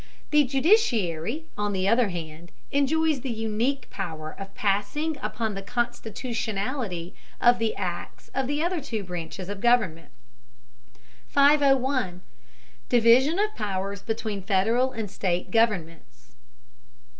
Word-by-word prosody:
The 295 -1 +5
judiciary, 260 - +2
on 205 0 -1
the 190 0 0
other 230 0 +4
hand, 170 -1 -7 0.2
enjoys 295 +1 +2
the 265 - -4
unique 225 +4 -1
power 160 -5 -5
of 195 0 -8
passing 210 +11 0
upon 215 0 -2
the 195 - -5
constitutionality 225 -3 -3 0.3
of 240 0 +5
the 225 -1 0
acts 175 -3 -5
of 265 -1 -1
the 290 +3 0
other 345 -1 0
two 230 -7 -4
branches 175 0 -6
of 200 0 -6
government. 220 -9 +2 1.2
501. 270 -8 +3 0.7
DIVISION 245 +7 +5
OF 425 +1 0
POWERS 200 -1 -3
BETWEEN 220 -2 -3
FEDERAL 220 +7 +2
AND 220 -5 -5
STATE 180 -2 -1
GOVERNMENTS. 165 - -1
220 Hz, 120 wpm, -26 LUFS, 190-260 Hz, 1.2 s, The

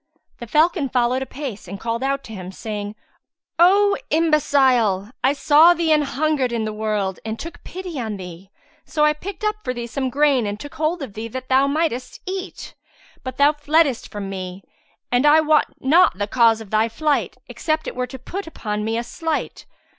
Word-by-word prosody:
The 235 - -7
falcon 305 - +2
followed 250 +1 +1
apace 265 -7 -6
and 195 +2 -7
called 230 +2 -3
out 275 +1 -1
to 225 - -10
him, 185 -2 -7
saying, 205 +1 -6 0.6
"O 400 +3 +5
imbecile, 265 - +2
I 265 +2 +4
saw 310 +4 +6
thee 330 -2 0
an 305 -1 +5
hungered 290 -2 0
in 230 -2 -1
the 215 - -3
wold 210 -3 -2
and 220 0 -4
took 335 +6 -9
pity 360 -5 -6
on 220 -4 -3
thee; 180 0 -10 0.3
so 300 -1 +1
I 300 - +4
picked 375 +6 -8
up 425 0 0
for 250 - -3
thee 240 0 -4
some 260 +2 -3
grain 275 -4 +2
and 205 +1 -4
took 290 - -9
hold 315 +1 -1
of 220 - -8
thee 220 +2 -5
that 255 +3 -7
thou 265 +1 +4
mightest 280 -4 -2
eat; 375 0 -6 0.5
but 255 -1 -6
thou 285 +1 +5
fleddest 295 -3 +1
from 205 -1 -6
me; 185 -1 -6 0.5
and 245 +1 +3
I 295 +1 +6
wot 310 -1 +3
not 315 - +4
the 205 - -1
cause 225 0 +3
of 210 - -11
thy 220 +1 +2
flight, 295 +5 -1
except 315 0 -2
it - - -5
were 250 0 -2
to 265 - -8
put 360 +9 -6
upon 210 -9 -4
me 225 +1 -1
a 235 - -1
slight. 320 +6 -4
260 Hz, 195 wpm, -21 LUFS, 220-310 Hz, 0.6 s, saw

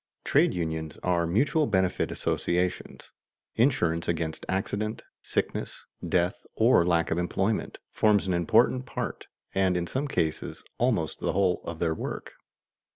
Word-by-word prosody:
Trade - - +3
unions 80 -2 -3
are 85 -2 +1
mutual 140 - +2
benefit 95 -2 +1
associations: 90 +1 -2 0.4
insurance 100 - +1
against 80 -2 -2
accident, 100 +3 -2 0.2
sickness, - - -3 0.2
death, 90 +1 +1
or 115 -5 +5
lack 85 -1 +1
of 80 - +1
employment, 95 +4 -1
forms 105 -2 +3
an 95 - 0
important 120 - +3
part, - - -5 0.3
and 95 -2 +2
in 85 - -1
some 135 +10 -2
cases 80 - -2 0.2
almost - - +1
the - - -1
whole 95 -2 +2
of 85 - -5
their 80 -1 0
work. - - -6
90 Hz, 135 wpm, -27 LUFS, 85-105 Hz, 0.4 s, or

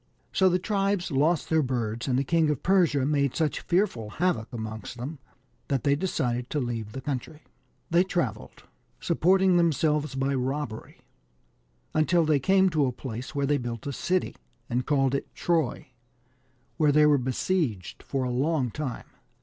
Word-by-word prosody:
So 190 -1 +4
the 180 - +2
tribes 195 -1 -1
lost 150 +4 +2
their 160 0 +4
birds, 120 -3 -2
and 125 -2 +1
the 135 - +2
King 160 +2 +2
of 150 -4 -2
Persia 175 -8 +3
made 140 -2 +1
such 155 -3 0
fearful 175 - 0
havoc 160 -5 -1
amongst 110 0 -6
them 135 +5 -6 0.5
that 135 -4 -1
they 140 0 +3
decided 125 -7 -2
to 150 - -1
leave 115 -4 -4
the 135 - -5
country. 145 +3 -5 0.5
They 170 +2 +5
travelled, 130 - -3 0.4
supporting 185 +2 +3
themselves 150 -3 +1
by 135 +1 0
robbery,, 130 -3 -4 0.9
until 165 +2 +3
they 155 -2 +3
came 190 +5 +3
to 150 -4 +2
a - - 0
place 125 +2 -7
where 140 -1 +1
they 145 +1 +1
built 120 -2 -5
a 140 - -3
city, 185 +6 -1 0.4
and 125 +1 -1
called 135 -3 +2
it 140 - -4
Troy, 160 -4 -1 0.9
where 150 -3 +4
they 150 +1 +5
were 145 -2 +4
besieged 125 - -2
for 135 -2 -2
a 125 - -1
long 135 0 0
time. 145 -3 -5
145 Hz, 165 wpm, -27 LUFS, 125-170 Hz, 0.9 s, They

